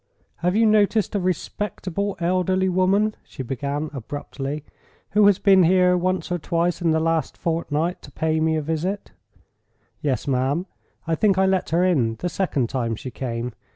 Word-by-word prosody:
"Have 180 +3 0
you 225 +1 +4
noticed 215 0 +3
a 205 - +1
respectable 195 +1 -3
elderly 185 +2 +1
woman," 195 +4 +2
she 130 - -8
began, 140 +4 -3
abruptly, 140 +2 -5 0.5
"who 210 0 +5
has 200 -2 +5
been 195 -2 +5
here 180 +1 +4
once 180 -1 -1
or 175 - 0
twice 170 +2 0
in 170 - +2
the 160 0 +3
last 165 0 0
fortnight 165 +1 -1
to - - -13
pay 160 0 0
me 160 0 +2
a 155 - -1
visit?" 165 +6 -3 0.9
"Yes, 140 -1 -1
ma'am; 135 +6 0 0.4
I 165 - -1
think 195 +3 +2
I 190 - +4
let 190 -1 +1
her 170 +3 +2
in 125 -11 +2
the 180 - -3
second 160 -10 0
time 115 -3 -2
she 130 +4 -7
came. 120 -1 -4
170 Hz, 170 wpm, -23 LUFS, 145-185 Hz, 0.9 s, who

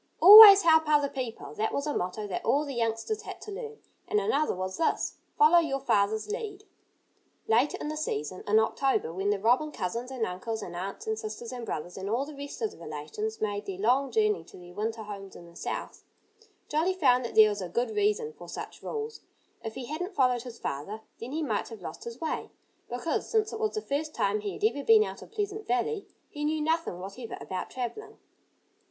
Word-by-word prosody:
"Always 400 +1 +12
help 320 -2 +5
other 290 -2 +3
people!" 250 -5 -6
That 220 - -1
was 280 - -2
a 295 - -2
motto 185 +4 -2
that 190 -3 -4
all 290 +2 +2
the 280 - -5
youngsters 230 - -1
had - - -8
to 425 - -8
learn. 445 +1 -7 0.3
And 420 - +2
another 420 - +1
was 185 +1 -4
this: 325 - 0 0.2
"Follow 445 -6 +7
your 285 -5 -1
father's 215 -4 +1
lead!" 425 -2 -5 0.8
Later 240 +6 +3
in - - -4
the 305 - -3
season, 185 - -3
in 210 +1 +4
October, 220 -4 +1
when 195 +3 -1
the 205 - +2
robin 245 +9 +2
cousins 235 +3 -4
and 255 -4 -2
uncles 215 +4 -4
and 175 - -7
aunts 190 +3 -5
and 220 0 -2
sisters 220 +2 -6
and 245 -2 -6
brothers 175 +3 -5
and 190 +1 -4
all 240 +6 0
the 300 0 -10
rest 280 -3 -7
of 220 - 0
the - - -16
relations 155 +8 -5
made 205 -1 -2
their 190 -2 -4
long 250 +7 +2
journey 425 +2 +1
to - - -14
their 175 -1 -13
winter 220 +3 -3
homes 200 -2 -9
in 170 - -11
the 170 0 -16
South, - - -5 0.6
Jolly 330 +5 +1
found 255 -8 +3
that 235 - -6
there 215 -1 +8
was 205 -1 -3
a 180 - -5
good 240 +8 -1
reason 425 +2 0
for - - -12
such - - -7
rules. 445 0 -5 0.4
If 225 -1 -6
he 260 - -5
hadn't 360 - -5
followed 250 -3 +3
his 240 -1 -9
father 200 +10 -5 0.2
then 235 +3 -7
he 315 +2 -2
might 220 -8 -1
have 220 -5 -10
lost 160 - -8
his 235 +1 -7
way, 320 - -3 0.4
because 250 +7 -2
since 435 -1 +1
it 440 - -5
was 435 -1 -1
the 430 - -1
first 300 +2 -3
time 200 +2 +1
he 205 -1 -4
had - - -9
ever 355 -10 +1
been 440 +3 +6
out - - -7
of - - -12
Pleasant 420 -1 -4
Valley 250 - -1 0.2
he 295 - -7
knew 310 +1 0
nothing 320 - 0
whatever 200 +6 -7
about 185 -1 -5
travelling. 255 - -6
250 Hz, 215 wpm, -28 LUFS, 210-325 Hz, 0.8 s, Always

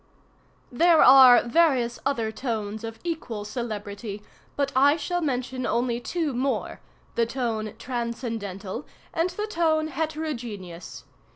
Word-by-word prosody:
"There 330 +6 +5
are 255 -2 +9
various 245 -3 +2
other 230 -6 -1
tones 220 -2 -4
of 225 0 -6
equal 255 -11 -4
celebrity, 210 -2 -5 0.3
but 280 -1 0
I 285 +4 +5
shall 350 +3 -2
mention 255 -3 -2
only 235 0 0
two 315 +2 -2
more—the 250 -2 -3
tone 230 -4 -3
transcendental 230 -3 -4 0.3
and 335 +2 +1
the 420 +4 -4
tone 320 -6 +1
heterogeneous. 235 - -5
245 Hz, 110 wpm, -25 LUFS, 220-295 Hz, 0.3 s, are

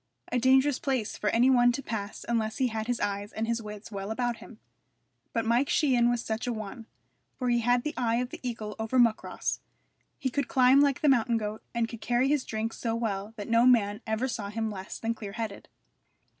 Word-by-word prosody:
A 250 - +2
dangerous 265 +2 +4
place 260 -6 -1
for 210 - -1
any 245 +5 +4
one 245 -1 +5
to 275 +2 -4
pass 210 -3 -5
unless 220 -2 0
he 255 -2 +2
had 220 0 -3
his 245 -1 -1
eyes 200 0 -2
and 225 +1 -3
his 235 0 0
wits 210 0 -9
well 195 0 -5
about 240 +1 -1
him; 230 - -13 0.7
but 230 -4 -1
Mike 240 +4 +2
Sheehan 245 -5 +3
was 240 -1 -1
such 225 +3 -3
a - - +1
one, 220 +1 -6 0.5
for 250 -2 -1
he 240 0 +3
had 245 +1 +2
the 300 - -2
eye 230 -2 +1
of 245 +1 -1
the - - -7
eagle 225 -4 -4
over 225 +3 -1
Muckross, 235 -3 +1 0.6
he 260 - -2
could 280 0 -1
climb 260 +1 +5
like 280 -2 +2
the 305 - +3
mountain 240 -3 +3
goat, 215 0 -4
and 235 -1 +1
could 230 -1 -9
carry 245 +2 +2
his 290 -2 +1
drink 220 +1 -3
so 230 -1 -2
well 215 -2 -3
that 205 - -6
no 230 +2 +4
man 210 -4 +3
ever 220 +4 0
saw 215 -5 -4
him 220 +1 -2
less 190 -1 -7
than 230 0 -1
clear 205 -3 -8
headed. 215 -2 -5
230 Hz, 220 wpm, -28 LUFS, 220-250 Hz, 0.7 s, one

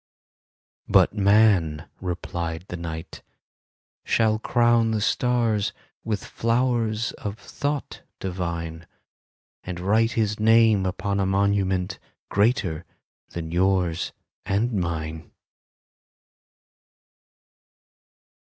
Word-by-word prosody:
"But - - +4
man," 100 -7 +3
replied 85 -2 -4
the - - -4
Night, 85 0 -7 0.8
"shall 110 -1 +2
crown 120 -1 +3
the 110 -1 0
stars 115 -2 +1 0.3
With 110 -2 -2
flowers 115 -1 0
of 105 0 -5
thought 145 +3 -4 0.2
divine, 85 -3 -4 0.8
And 90 -1 -5
write 110 +5 +2
his 105 -2 0
name 110 -3 +5
upon 100 +2 -2
a 95 - +1
monument 95 -1 +1 0.3
Greater 100 - +1 0.5
than 80 -1 -5
yours 90 -1 +1 0.3
and 110 +5 0
mine." 80 -4 -3
100 Hz, 85 wpm, -24 LUFS, 85-110 Hz, 0.8 s, name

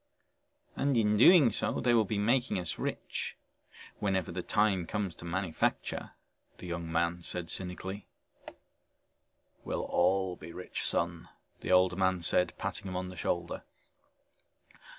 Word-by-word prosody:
"And 140 -3 +1
in 105 -2 +3
doing 140 - +7
so - - -1
they 120 - +3
will 115 -2 +4
be 105 +2 -2
making 120 +4 +2
us 90 -2 -3
rich - - -3 0.6
whenever 95 -4 0
the 90 +1 -3
time 100 -3 +1
comes 100 -4 -2
to 85 - -12
manufacture," 85 -1 -2 0.4
the - - -10
young 85 -1 -4
man 85 +1 0
said 85 0 -2
cynically. 95 +2 -4 1.6
"We'll - - -2
all 95 0 +1
be 85 0 -10
rich, 90 - -5
son," 85 0 -1 0.3
the - - -3
older 90 0 +5
man 95 -2 +1
said, 90 +1 +2
patting 100 +1 -4
him 90 - -5
on 90 0 -3
the 90 - -9
shoulder. - - -2
95 Hz, 140 wpm, -31 LUFS, 85-105 Hz, 1.6 s, doing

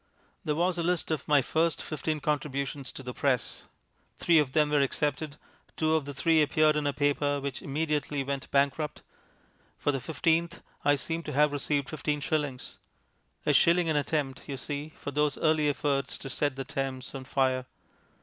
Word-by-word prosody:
There 150 -4 0
was 175 +2 +1
a - - +1
list 175 -1 0
of 155 - -2
my 145 -3 +5
first 160 +3 +1
fifteen 155 0 -3
contributions 140 -1 -2
to 135 - -8
the 125 -1 -5
Press. 130 -2 -1 0.5
Three 170 -2 +5
of 135 -3 0
them 150 -1 +3
were 145 -1 +4
accepted; 145 +2 -1 0.4
two 155 0 +2
of 160 -3 +1
the 145 - -5
three 160 +3 +4
appeared 155 +1 +3
in 150 -1 0
a - - +2
paper 145 0 +1
which 140 -1 -4
immediately 145 -1 -1
went 140 0 -4
bankrupt. 140 +2 0 0.7
For 145 - +1
the 135 - -2
fifteenth 165 +4 0 0.2
I 145 - +4
seem 165 +4 -3
to - - -6
have 150 +2 +4
received 145 -1 0
fifteen 150 -1 -2
shillings. 145 -4 -3 0.7
A - - +3
shilling 170 0 +4
an 155 - +1
attempt, 145 -2 -1
you 135 - -3
see, 145 +2 -4
for 145 - -7
those 150 0 +1
early 155 -2 +3
efforts 140 -1 -1
to 135 - -7
set 145 0 0
the 135 0 -4
Thames 130 0 -4
on 135 - -6
fire. 130 -1 0
145 Hz, 180 wpm, -29 LUFS, 140-155 Hz, 0.7 s, my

